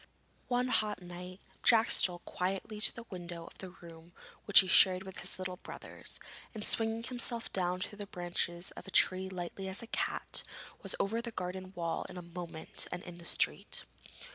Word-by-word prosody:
One 250 0 +1
hot 215 -3 +1
night 180 +1 -8 0.2
Jack 230 -1 +6
stole 175 -1 +4
quietly 195 +4 -2
to - - +8
the 230 - -8
window 175 -2 -6
of - - -14
the 190 - -6
room 170 -1 -13 0.3
which 205 - +10
he 190 - -5
shared 185 +1 +6
with 190 -1 -8
his - - -5
little 185 -1 -4
brothers, - - -7 0.4
and 210 - -1
swinging 225 0 +1
himself 240 -1 -1
down 180 -1 0
through 205 +2 -5
the 205 - -5
branches 175 -1 -2
of 185 - -10
a - - -6
tree 185 0 +4
as - - -8
lightly 185 +1 -4
as 190 +4 -2
a 230 - -12
cat, - - 0 0.4
was - - -1
over 225 +4 +1
the 235 - -4
garden 185 -2 -4
wall 170 -1 -2
in - - -8
a 180 - -6
moment 170 -2 -3
and 180 - -4
in 175 - -7
the 170 0 -11
street. - - +1
185 Hz, 190 wpm, -33 LUFS, 175-210 Hz, 0.4 s, which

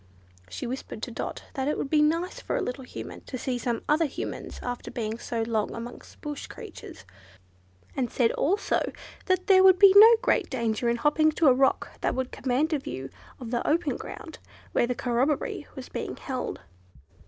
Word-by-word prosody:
She 90 - -5
whispered 255 +3 -6
to - - -3
Dot - - -5
that 270 -2 -2
it 300 - 0
would 275 - -3
be 305 -1 +5
nice 330 +4 +1
for - - -3
a - - 0
little 255 +2 -4
Human 250 - -8
to 255 - -5
see 250 0 -2
some 235 -1 -2
other 310 +2 +3
Humans 275 - -6
after 245 0 -4
being 225 -1 -4
so 230 -1 -2
long 225 -2 -1
amongst 235 +1 -9
bush 295 -1 -5
creatures, - - -10 0.9
and 250 -3 -1
said, 235 -3 +2
also, 395 +7 0 0.4
that 370 -1 +1
there 380 -2 +6
would 375 -1 +7
be 395 -1 +8
no 445 +3 +10
great - - +2
danger 235 -2 0
in 235 - +2
hopping 300 +5 +3
to 325 - +1
a 265 - +8
rock 265 +1 +2
that - - 0
would 260 0 -2
command 275 +5 0
a 300 - +1
view 135 - -6 0.3
of 240 -3 -7
the 240 - 0
open 330 +3 +1
ground - - -9 0.3
where 240 - +2
the 250 - -1
corroboree 260 +3 -1
was - - -7
being - - -5
held. 260 -2 -4
265 Hz, 190 wpm, -27 LUFS, 240-310 Hz, 0.9 s, no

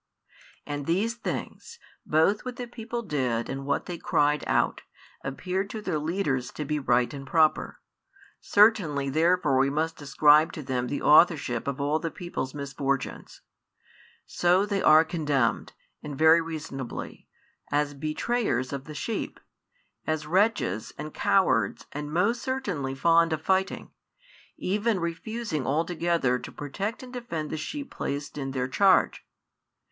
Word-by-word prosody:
And 145 -1 -5
these 200 +7 +1
things, 465 - -6 0.3
both 160 +7 +3
what 250 -1 -5
the 245 - -5
people 235 0 -6
did 130 - -1
and 135 +1 -5
what 140 - 0
they 175 -2 -6
cried 150 0 +1
out, - - +1 0.4
appeared 185 +8 -3
to 220 - -5
their 160 -7 -2
leaders 150 -6 -1
to 150 - -4
be 150 +1 -1
right 125 -2 +2
and 140 -1 -8
proper; 155 +1 +2 0.6
certainly 170 -11 +3
therefore 160 -3 +3
we 135 +1 +3
must 160 +2 -2
ascribe 150 +3 +4
to 155 - -6
them 125 -1 -2
the 145 - -3
authorship 145 -7 +4
of 140 -1 -2
all 145 +2 +1
the 165 - -3
people's 160 -7 -5
misfortunes. 140 -1 -3 0.8
So 180 +3 +2
they 200 -2 -1
are 155 +1 +6
condemned, 145 -8 0 0.3
and 145 -2 -7
very 160 +2 +6
reasonably, 155 -6 -6 0.4
as 145 0 +1
betrayers 155 - -1
of 135 -1 -5
the 155 - -9
sheep, 225 +8 -4 0.7
as 155 -1 -1
wretches 180 - +1
and 150 +1 -6
cowards 115 - +2
and 150 +1 -5
most 205 +9 +1
certainly 200 - -2
12 135 - -11
fond 165 0 +4
of 155 0 -4
fighting, 190 0 0 0.7
even 210 +2 0
refusing 170 - -3
altogether 165 -3 +1
to - - -9
protect 200 - -5
and 255 0 -11
defend 170 -12 -4
the - - -2
sheep 280 - -5
placed 140 +1 -4
in 135 -1 -3
their 130 -1 -2
charge. 190 +8 +3
155 Hz, 145 wpm, -27 LUFS, 140-190 Hz, 0.8 s, are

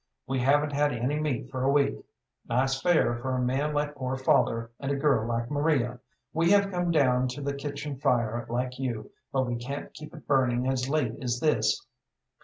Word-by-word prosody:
We 135 0 -1
haven't 145 +3 +2
had 145 +1 +2
any 125 +6 -1
meat 135 -4 -2
for 130 - -3
a 135 - +3
week. 140 0 +3 0.6
Nice 130 +3 +1
fare 160 -8 +3
for 130 +2 -2
a - - 0
man 135 +4 0
like 150 0 -1
poor 130 -2 -3
father 115 -3 +2
and 140 0 -2
a - - +1
girl 135 -6 +2
like 120 +2 -2
Maria! 145 -5 +1 0.3
We 165 +2 +2
have 200 -1 +3
come 175 -1 -1
down 130 -5 +3
to 125 +3 -5
the 140 0 -1
kitchen 140 0 -5
fire 120 -3 +1
like 125 +2 -2
you, 120 -5 -3 0.2
but 130 -1 +1
we 120 -1 -2
can't 140 +4 -6
keep 155 +3 -10
it 155 - -12
burning 130 -2 +2
as 130 0 0
late 155 +1 +1
as 120 -1 -1
this. 160 - +1
135 Hz, 200 wpm, -28 LUFS, 125-145 Hz, 0.6 s, a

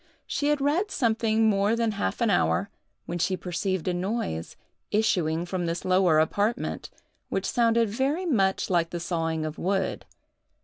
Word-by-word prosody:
She 290 - -1
had 295 -1 +2
read 320 +9 +1
something 225 - +2
more 205 +1 +2
than 230 -1 +1
half 200 +4 -3
an 230 -3 +3
hour, 200 +1 +1 0.3
when 175 - -4
she 185 +2 +1
perceived 180 0 -2
a 180 - +1
noise 175 - -3 0.3
issuing 175 -6 +1
from 180 -1 -2
this 165 +1 -3
lower 185 -3 +4
apartment, 205 +9 0 0.4
which - - -2
sounded 230 -1 +2
very 270 - -1
much 195 - +1
like 170 -2 +2
the 175 - -4
sawing 165 -2 -2
of 155 +1 -5
wood. 190 +1 -1
195 Hz, 160 wpm, -26 LUFS, 175-230 Hz, 0.4 s, lower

